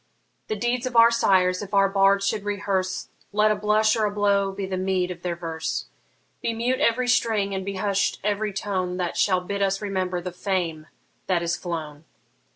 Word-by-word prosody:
The 215 - -2
deeds 240 +3 -1
of 250 - -6
our 230 0 +7
sires 185 -5 +3
if 205 0 -5
our 195 0 +5
bards 195 0 +3
should 205 0 -1
rehearse, 200 -2 -2 0.2
Let 210 +1 +3
a - - +2
blush 215 +1 +2
or 220 -2 +1
a - - +1
blow 200 -1 +2
be 195 0 -4
the 190 0 -3
meed 185 -1 0
of 175 -1 -8
their 175 -1 -2
verse! 165 -2 -4 0.6
Be 230 - -1
mute 245 +3 0
every 245 +2 +2
string, 220 -5 +1
and 190 0 -2
be 195 +1 -4
hush'd 200 +1 0
every 210 +1 0
tone, 185 -2 -2
That 180 -2 -2
shall 185 -2 +2
bid 200 +2 -4
us 195 0 +1
remember 185 -3 -2
the 180 +1 -5
fame 175 -4 -2 0.4
that 175 -3 +1
is 170 0 0
flown. 155 -4 -6
195 Hz, 195 wpm, -24 LUFS, 185-210 Hz, 0.6 s, our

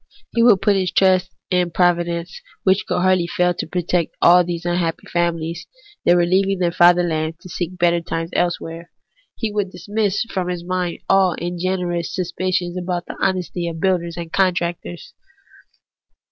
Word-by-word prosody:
He 235 - +2
would 230 -5 +5
put 205 -2 +4
his 185 -2 0
trust 185 -1 +3 0.2
in 180 -1 +2
Providence, 175 -1 0 0.2
which 190 +1 +2
could - - 0
hardly 185 -2 +3
fail 180 0 +1
to - - -5
protect 175 -1 -1
all 180 +1 +6
these 170 -1 -5
unhappy 175 -1 -1
famihes 170 0 -2 0.4
that 175 - +5
were 175 -1 +3
leaving 195 +2 +2
their 175 -2 +1
fatherland 170 -2 +3
to 185 - -12
seek 175 0 -4
for - - -14
better 170 -1 +2
times 165 0 -4
elsewhere. 170 -1 -2 0.5
He 225 -2 -3
would 205 -2 -1
dismiss 210 +1 -1
from 190 -6 -3
his 175 -1 -3
mind 180 -1 -3
all 190 -3 +3
ungenerous 175 0 -2
suspicions 185 -1 -2
about 180 -1 -3
the - - -8
honesty 180 -2 -1
of 165 -1 -5
builders 175 -2 0
and 170 -1 -7
contractors. 175 -2 -1
175 Hz, 160 wpm, -20 LUFS, 170-185 Hz, 0.5 s, all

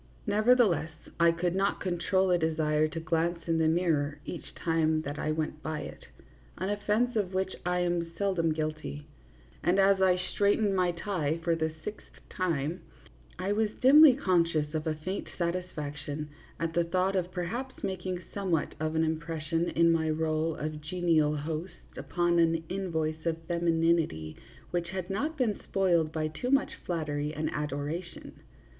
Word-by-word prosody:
Nevertheless, 210 - +3 0.3
I 170 0 +6
could 170 +1 -1
not 195 +2 +1
control 185 +1 +1
a 175 - +5
desire 155 -1 +1
to 165 +1 -5
glance 165 +1 0
in 165 -1 +2
the 160 - +3
mirror 155 -4 +1
each - - -8
time 160 -2 +1
that 145 0 -5
I - - -1
went 155 -1 -3
by 155 -1 -3
it - - -9 0.5
an 195 - -2
offence 210 +4 +1
of 190 -4 -1
which 190 0 -1
I 180 0 +1
am 175 -1 -1
sel 200 +1 +1
dom 165 -3 +1
guilty 155 -1 -3 0.6
and 175 +3 +3
as 195 0 +4
I 185 -1 +5
straightened 200 +2 +1
my 180 -1 +2
tie 170 -4 -1
for 170 0 +2
the 160 -1 -1
sixth 210 +4 -8
time 165 -2 -1 0.6
I 190 +2 -1
was 215 +1 +2
dimly 280 +1 +8
conscious 165 - +1
of 155 0 -2
a 155 - 0
faint 185 +6 -4
satisfac 170 -4 -3
tion 150 +1 -5 0.3
at 165 -1 -2
the 170 +1 +3
thought 185 +3 0
of 180 -1 -1
perhaps 225 +10 -4
making 185 -2 -3
somewhat 185 -6 0
of 155 0 -1
an 160 - +3
impression 160 +1 -1
in 170 0 +4
my 160 -1 +1
role 155 0 0
of 155 0 -4
genial 155 -2 +2
host 160 +4 -4 0.2
upon 175 -1 +1
an 165 -1 +3
in 190 0 -3
voice 155 -1 -2
of 165 -1 +1
femininity 165 - +1 0.4
which 175 -1 -1
had 185 -1 -4
not 300 +11 -2
been 235 -6 0
spoiled 170 -5 +1
by 155 -1 -1
too 200 +11 -4
much 275 +1 +3 0.2
flattery 150 -3 -2
and 155 0 -2
adoration. 150 +4 -4
170 Hz, 165 wpm, -29 LUFS, 155-185 Hz, 0.6 s, dimly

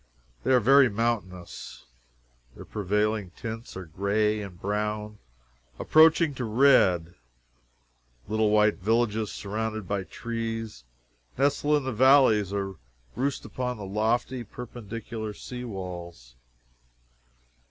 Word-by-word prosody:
They 130 - +1
are 130 - +6
very 135 +3 +6
mountainous. 100 - -4 0.7
Their - - -10
prevailing 105 0 -1
tints 115 -3 -7
are 95 - -7
gray 105 +5 0
and 95 -4 -9
brown, 105 +1 -3 0.6
approaching 160 0 +5
to 130 - -5
red. 105 -8 +4 1.1
Little 110 0 +1
white 105 0 +3
villages 110 +1 0
surrounded 110 0 -4
by 100 -1 -2
trees, 115 - -5 0.5
nestle 145 +2 +2
in 145 - -3
the 130 -1 -3
valleys 120 -5 +5
or 100 -2 -3 0.4
roost 135 +2 -2
upon 125 -1 -3
the 105 - -7
lofty 115 +5 -1
perpendicular 110 -1 -7
sea 125 +3 -7
walls. 85 - -8
110 Hz, 110 wpm, -27 LUFS, 100-120 Hz, 1.1 s, are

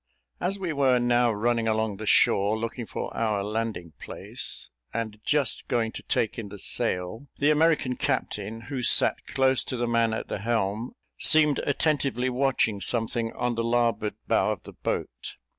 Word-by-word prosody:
As 185 +3 -1
we 180 -5 -3
were 135 -3 +3
now 120 0 +2
running 115 +2 0
along 110 -2 0
the 110 +1 -7
shore, 100 +2 +3
looking 115 +1 -5
for - - -5
our 110 -3 0
landing 105 -6 -4
place, - - -5 0.2
and 110 -2 -4
just 145 -3 +1
going 115 -3 0
to - - -8
take 115 +1 -1
in 105 -3 -6
the 100 - -9
sail, 95 +6 -1
the 145 +2 +3
American 150 -4 +2
captain, 115 -5 -3
who 135 +2 -5
sat - - +4
close 130 -1 +2
to 130 - -3
the 120 - -1
man 115 -1 +1
at 110 - -4
the - - -4
helm, 110 +1 -1 0.3
seemed 150 -2 +5
attentively 140 -4 0
watching 125 -6 +1
something 115 0 +1
on 125 0 -1
the 115 0 -2
larboard 115 -3 0
bow - - +2
of - - -5
the - - -11
boat. - - -4
115 Hz, 170 wpm, -26 LUFS, 110-130 Hz, 0.3 s, seemed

